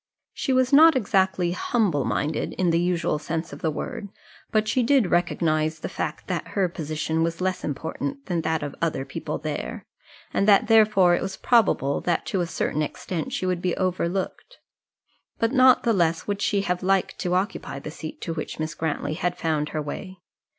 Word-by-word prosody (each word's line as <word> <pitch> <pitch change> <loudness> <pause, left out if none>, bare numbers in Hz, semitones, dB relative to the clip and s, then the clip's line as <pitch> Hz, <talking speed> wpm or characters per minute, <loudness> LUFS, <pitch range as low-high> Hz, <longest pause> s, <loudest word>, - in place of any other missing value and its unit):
She 270 - -2
was 255 0 +2
not 320 +2 +8
exactly 190 -6 +1
humble 180 - 0
minded 150 +1 -1
in 180 -2 +1
the 165 - +2
usual 175 -3 0
sense 165 0 -4
of 145 - -9
the 160 - +1
word; 210 - -5 0.4
but 215 0 +2
she 255 - +2
did 245 -5 +3
recognize 160 -2 +1
the - - -5
fact - - -4
that - - -3
her 190 -2 +3
position 160 -1 -2
was 165 0 -1
less 185 0 -1
important 270 - -4
than 175 -4 -1
that 160 -1 -1
of 145 - -4
other 155 -5 -1
people - - -4
there, - - -5 0.5
and 200 - +1
that 200 -2 +6
therefore 215 -5 +5
it - - +1
was 190 0 -4
probable 215 - +2
that 175 -2 0
to 190 - -1
a 175 - -1
certain 155 -2 -1
extent 160 +2 -4
she - - -2
would 180 -1 -1
be 180 -1 -1
overlooked. 185 - -2 0.8
But 230 0 +1
not 255 -1 +5
the 230 - +3
less 170 -4 +1
would 205 0 -3
she 200 -1 +1
have 180 -2 -1
liked 190 0 +1
to 180 -1 0
occupy 180 -7 -2
the 145 +2 -7
seat 155 0 -8
to 165 - -3
which 155 - -5
Miss 155 0 -3
Grantly 150 -1 -2
had 175 +2 -2
found 155 -2 -1
her 155 - -3
way. 185 +6 -7
180 Hz, 190 wpm, -25 LUFS, 160-200 Hz, 0.8 s, not